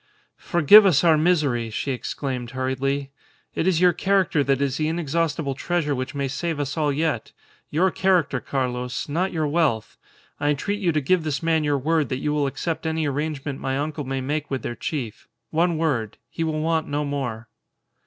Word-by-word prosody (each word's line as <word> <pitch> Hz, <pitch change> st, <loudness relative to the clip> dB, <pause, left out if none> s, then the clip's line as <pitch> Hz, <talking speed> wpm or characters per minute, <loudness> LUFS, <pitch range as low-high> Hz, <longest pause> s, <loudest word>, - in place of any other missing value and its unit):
"Forgive 175 Hz, +5 st, +7 dB
us 170 Hz, -5 st, +4 dB
our 165 Hz, -2 st, +6 dB
misery!" 150 Hz, -8 st, +1 dB
she 125 Hz, +5 st, -3 dB
exclaimed, 125 Hz, -1 st, -4 dB
hurriedly. 135 Hz, +2 st, -1 dB, 0.4 s
"It 165 Hz, -, -1 dB
is 180 Hz, -4 st, +3 dB
your 180 Hz, -1 st, +5 dB
character 190 Hz, -4 st, +2 dB
that 135 Hz, 0 st, +1 dB
is 140 Hz, -1 st, 0 dB
the 155 Hz, -, 0 dB
inexhaustible 160 Hz, -2 st, -1 dB
treasure 155 Hz, +1 st, -1 dB
which 130 Hz, +1 st, -4 dB
may 140 Hz, -1 st, -1 dB
save 160 Hz, +3 st, -3 dB
us 140 Hz, -1 st, -2 dB
all 150 Hz, -2 st, +1 dB
yet; 150 Hz, -4 st, -1 dB, 0.4 s
your 180 Hz, +5 st, +2 dB
character, 175 Hz, -9 st, +2 dB
Carlos, 125 Hz, -1 st, -3 dB
not 175 Hz, +6 st, -1 dB
your 160 Hz, -2 st, -1 dB
wealth. 145 Hz, -9 st, 0 dB, 0.4 s
I 145 Hz, 0 st, +1 dB
entreat 200 Hz, +8 st, -1 dB
you 180 Hz, -4 st, +1 dB
to 155 Hz, -1 st, 0 dB
give 175 Hz, +5 st, +2 dB
this 150 Hz, -1 st, -2 dB
man 165 Hz, -1 st, +2 dB
your 145 Hz, -1 st, +1 dB
word 155 Hz, +1 st, +1 dB
that 130 Hz, -, -1 dB
you 150 Hz, +3 st, -1 dB
will 145 Hz, -2 st, +1 dB
accept 160 Hz, +4 st, -3 dB
any 160 Hz, 0 st, 0 dB
arrangement 145 Hz, -1 st, -3 dB
my 135 Hz, 0 st, -2 dB
uncle 150 Hz, +1 st, -3 dB
may 135 Hz, 0 st, -3 dB
make 145 Hz, +3 st, -2 dB
with 135 Hz, -1 st, -3 dB
their -, -, -3 dB
chief. 125 Hz, -8 st, -5 dB, 0.2 s
One 170 Hz, +1 st, +2 dB
word. 125 Hz, -10 st, -1 dB
He 165 Hz, -, -2 dB
will 155 Hz, -1 st, -1 dB
want 160 Hz, 0 st, 0 dB
no 145 Hz, +1 st, -1 dB
more." 125 Hz, -5 st, -4 dB
150 Hz, 190 wpm, -23 LUFS, 135-165 Hz, 0.4 s, Forgive